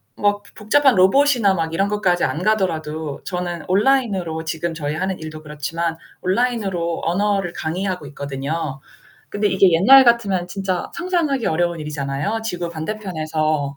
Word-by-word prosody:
뭐 205 0 +1
보 - - -32
복잡한 270 +5 +3
로봇이나 225 +2 +4
막 165 -3 -2
이런 195 +4 +1
것까지 195 -4 +1
안 155 - -1
가더라도 160 -8 -1
저는 180 -2 -4
온라인으로 195 -6 +1
지금 160 +1 -3
저희 150 -2 -3
하는 190 +3 -2
일도 155 0 -8
그렇지만 160 +2 -3 0.2
온라인으로 190 -5 -1
언어를 195 0 0
강의하고 180 0 -3
있거든요. 140 +1 -4 0.5
근데 205 0 0
이게 190 -1 +4
옛날 260 +11 +7
같으면 205 -7 +2
진짜 185 0 -3
상상하기 335 - 0
어려운 170 0 0
일이잖아요. 150 +7 -3
지구 180 -5 -3
반대편에서 155 -5 -2
180 Hz, 370 characters per minute, -20 LUFS, 160-205 Hz, 0.5 s, 옛날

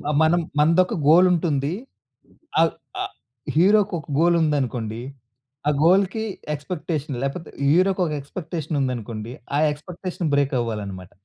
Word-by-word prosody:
హ్మ్. - - -11 0.2
మనం 170 +2 +4 0.2
మనదొక 170 +7 +4
గోల్ 175 +4 +7
ఉంటుంది. 150 -5 0 0.9
ఆహ్, 165 0 +4 0.3
అ - - -1 0.5
హీరోకొక 195 -2 +3
గోల్ 170 +1 +4
ఉందనుకోండి, 125 -7 -1 0.7
ఆ - - +5
గోల్‌కి 195 +5 +3 0.3
ఎక్స్‌పెక్టేషన్ 150 -2 -4
లేకపోతే 150 +5 -4 0.2
హీరోకి 185 +5 +3
ఒక 155 - -3
ఎక్స్‌పెక్టేషన్ 155 +1 -5
ఉందనుకోండి, 115 -3 -3 0.2
ఆ - - +3
ఎక్స్‌పెక్టేషన్ 175 +2 -5
బ్రేక్ 140 -1 +2
అవ్వాలి 115 -3 -2
అన్నమాట. 95 -2 -8
155 Hz, 125 wpm, -23 LUFS, 135-180 Hz, 0.9 s, గోల్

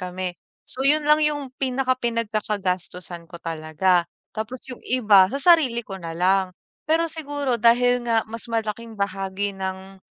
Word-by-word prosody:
kami. 180 0 -4 0.3
So, 255 - -6
yun 300 +2 +4
lang 300 +1 +5
yung 295 -3 0
pinaka 260 0 +1
pinagkakagastusan 200 -7 -2
ko 170 - -9
talaga. 165 +2 +1 0.3
Tapos 225 +4 -5
yung 250 - -8
iba 210 -7 +5
sa 275 - -3
sarili 290 -8 +5
ko 195 -1 -7
na 165 -2 -6
lang. 185 +1 +2 0.3
Pero 325 +1 +3
siguro 285 -6 -2
dahil 245 +2 +4
nga 225 -2 +2
mas 230 +2 -7
malaking 225 0 -3
bahagi 195 0 -2
ng 190 0 -6
215 Hz, 150 wpm, -23 LUFS, 190-255 Hz, 0.3 s, lang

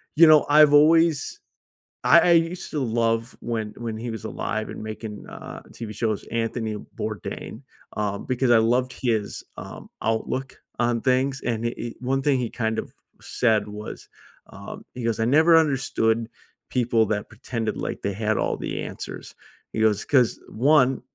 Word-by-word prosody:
you 165 +3 +8
know, 155 -1 +7
I've 150 0 +7
always 155 0 +4 0.6
I - - +7
I 175 - +4
used 165 +2 +1
to 150 - -1
love 115 -1 0
when 110 -3 -3
when 115 -2 -4
he 115 +1 -4
was 110 -2 -7
alive - - -3
and - - -7
making, 110 -1 -7
uh, - - -9
TV 110 -2 -7
shows, 110 -2 -1
Anthony 115 -1 -2 0.2
Bourdain, - - -5 0.4
um, 100 -1 -2
because 130 -1 +1
I 120 - +7
loved 125 +3 +1
his, 110 -5 -2
um, - - -9
outlook 115 +4 -2 0.2
on 120 -1 +1
things. 130 +1 +1
And 115 -1 -1
he 115 - -1
he 120 0 -5
one 135 +2 0
thing 140 -2 +2
he 120 -2 -2
kind 110 -2 -1
of - - -6 0.3
said 110 -4 +1
was, 105 +1 -8 0.4
um, - - -9
he 125 - -5
goes, 115 -1 -1
"I 110 - +2
never 160 +7 +5
understood 125 -7 +1 0.4
people 120 -3 +2
that 105 0 -2
pretended 115 -1 -4
like - - -4
they 100 - -2
had 110 +1 0
all - - 0
the - - -4
answers." - - -7 0.4
He - - -3
goes, 105 -2 +2
"'Cause, 130 -5 +3
1, 135 +1 +3
120 Hz, 165 wpm, -24 LUFS, 110-135 Hz, 0.6 s, you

